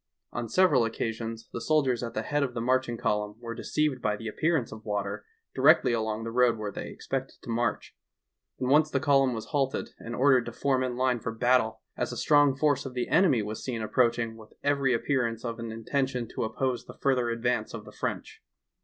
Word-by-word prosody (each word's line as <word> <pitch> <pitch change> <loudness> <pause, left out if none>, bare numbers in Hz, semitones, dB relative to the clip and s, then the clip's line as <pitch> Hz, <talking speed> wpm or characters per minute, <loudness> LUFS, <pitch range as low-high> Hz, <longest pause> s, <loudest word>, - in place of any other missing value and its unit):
On 115 - -3
several 165 -5 +4
occasions 115 0 -3
the 115 - -4
sol 155 +3 +2
diers 125 -3 0
at 115 -1 -5
the 110 - -1
head 145 +5 0
of 130 -3 -1
the - - -1
marching 125 0 +1
column 105 -1 -1
were 115 -1 -6
deceived 150 0 -1
by 105 -1 +1
the 110 +2 -7
appearance 155 +3 0
of 110 0 -9
water 100 -1 -3 0.3
directly 125 - +5
along 110 -1 -1
the 115 - -4
road 125 -1 +3
where 105 -1 -4
they - - -6
expected - - -4
to - - -5
march, 115 -1 -1 0.6
and 125 - -1
once 155 +1 +5
the 140 - 0
column 135 -3 +3
was 110 - -6
halted 135 -2 0
and 115 +1 -6
ordered 130 -2 +4
to - - -4
form 130 +2 0
in 125 -1 -3
line 130 -1 +1
for 115 - -4
battle 115 -1 +2
as - - -2
a - - -5
strong 145 -2 +4
force 145 -1 +2
of 130 -2 -7
the 125 - -2
enemy 140 - +4
was 105 +1 -5
seen 120 -4 -3
approaching 115 0 +1
with 110 -1 -15
every 140 -2 +2
appearance 120 -2 0
of 115 -1 -4
an 115 0 -5
inten 115 +5 -1
tion 125 -3 -4
to - - -2
oppose 125 +3 -2
the - - -12
further 125 -3 +1
advance 115 -1 -1
of - - -8
the - - -11
French. - - -5
120 Hz, 215 wpm, -28 LUFS, 115-135 Hz, 0.6 s, directly